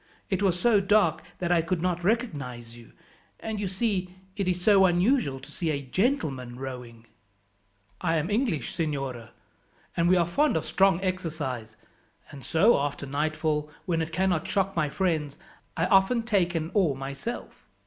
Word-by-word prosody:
It 190 - 0
was 185 -3 +2
so 220 +1 +4
dark 205 +2 +3 0.2
that 175 -1 -2
I 170 -2 +4
could 170 +1 -1
not 175 0 -1
recognize 140 - -2
you; 120 -1 -15 0.5
and, 220 -1 -4
you 200 - -1
see, 190 -2 -1 0.2
it 195 -2 -2
is 180 -1 0
so 195 +1 +5
unusual 175 - +2
to 135 +2 -13
see 165 +1 -2
a 145 -2 0
gentleman 135 - -1
rowing." 125 -3 -8 1.0
"I 165 - +1
am 160 +4 -1
English, 210 - 0
signora, 135 -8 -3 0.7
and 170 0 +2
we 185 - +6
are 170 - +3
fond 280 - +2
of 160 - -3
strong 195 -2 +3
exercise, 150 - -3 0.5
and 140 -2 -10
so 175 - +4
after 145 0 -3
nightfall, 150 +1 -1 0.2
when 170 -4 0
it 160 0 -3
cannot 175 -1 0
shock 195 0 0
my 155 -3 +1
friends, 155 -4 -1 0.4
I 165 - +2
often 195 +5 +3
take 190 -6 +1
an 165 +1 -2
oar 180 -10 +2
myself." 140 - -6
170 Hz, 165 wpm, -27 LUFS, 145-195 Hz, 1.0 s, we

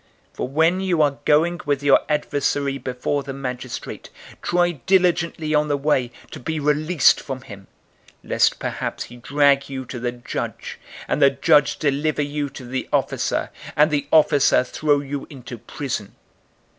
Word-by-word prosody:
012:058 - - -29
For - - -2
when 160 +7 +2
you 180 -4 +1
are 140 -2 0
going 165 +3 +3
with 145 -1 -1
your 140 -1 +6
adversary 140 -2 0
before 130 +3 -2
the 140 -1 -7
magistrate, 130 -2 -6 0.3
try 175 0 +2 0.2
diligently 170 -4 +2
on 150 0 +3
the 145 -1 0
way 135 -4 +1 0.2
to - - -8
be 160 +5 -3
released 150 +2 +3
from 135 -2 -6
him, 100 -5 -12 0.6
lest - - +2
perhaps - - -4
he 120 - -12
drag 140 +2 +2
you 130 -1 -5
to 120 0 -7
the 120 0 -2
judge, 120 0 -6 0.3
and - - -1
the 140 - +7
judge 140 +1 +3
deliver 145 +1 0
you 145 0 -3
to 135 -1 -10
the 130 +1 -4
officer, - - 0 0.2
and 150 +2 +4
the 145 -1 -1
officer 145 -4 +5
throw 145 +2 +1
you 140 0 -5
into 125 -4 -9
prison. 115 -5 -5
145 Hz, 160 wpm, -22 LUFS, 130-150 Hz, 0.6 s, the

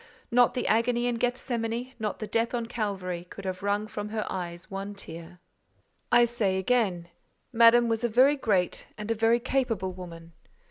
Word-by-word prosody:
Not 245 0 +4
the 250 - -1
agony 235 +2 +2
in 240 -1 0
Gethsemane, 245 0 -2
not 215 -1 -2
the 215 - -5
death 230 +3 0
on 235 -1 -2
Calvary, 190 -6 -4
could 200 - -9
have 185 0 -4
wrung 205 +1 0
from 210 -1 -6
her 215 0 -2
eyes 175 -1 -5
one 195 +1 -5
tear. 170 -1 -9 0.7
I 240 0 +6
say 220 -5 0
again, 190 -5 0 0.4
Madame 235 +1 +6
was 225 0 -1
a 240 - +2
very 260 +6 +5
great 200 -9 0
and 210 +1 -4
a - - +4
very 225 +2 +3
capable 235 -7 -1
woman. 170 -2 -10
220 Hz, 175 wpm, -27 LUFS, 190-240 Hz, 0.7 s, I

